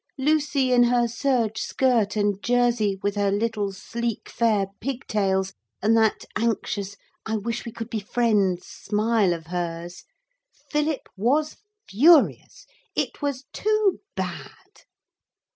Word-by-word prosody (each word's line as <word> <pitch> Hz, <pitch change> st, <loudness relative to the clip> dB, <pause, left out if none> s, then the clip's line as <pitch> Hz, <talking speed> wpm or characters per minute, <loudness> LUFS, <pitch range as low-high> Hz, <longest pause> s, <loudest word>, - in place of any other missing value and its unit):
Lucy, 280 Hz, -2 st, +2 dB
in 245 Hz, -1 st, +6 dB
her 240 Hz, 0 st, +3 dB
serge 230 Hz, -2 st, 0 dB
skirt 235 Hz, -6 st, +1 dB
and 205 Hz, -2 st, 0 dB
jersey, 240 Hz, -5 st, +2 dB
with 205 Hz, -, +1 dB
her 205 Hz, -1 st, +1 dB
little 205 Hz, 0 st, -1 dB
sleek 235 Hz, +3 st, -4 dB
fair 220 Hz, -4 st, +2 dB
pig 270 Hz, 0 st, -4 dB
tails, 195 Hz, -2 st, 0 dB, 0.3 s
and 220 Hz, +3 st, +3 dB
that 220 Hz, -1 st, +2 dB
anxious 210 Hz, -3 st, -1 dB, 0.3 s
'I 220 Hz, 0 st, 0 dB
wish 230 Hz, +3 st, -4 dB
we -, -, -5 dB
could 225 Hz, -1 st, -6 dB
be 220 Hz, -, -1 dB
friends' 205 Hz, -4 st, +1 dB
smile 215 Hz, -2 st, 0 dB
of 165 Hz, -2 st, -4 dB
hers. 175 Hz, 0 st, -5 dB, 0.7 s
Philip 300 Hz, -1 st, -1 dB
was 280 Hz, +10 st, +1 dB, 0.3 s
furious. 295 Hz, -, +4 dB, 0.3 s
It -, -, -2 dB
was 280 Hz, -2 st, -2 dB
too 430 Hz, -2 st, +1 dB, 0.2 s
bad. -, -, -7 dB
225 Hz, 125 wpm, -24 LUFS, 205-250 Hz, 0.7 s, in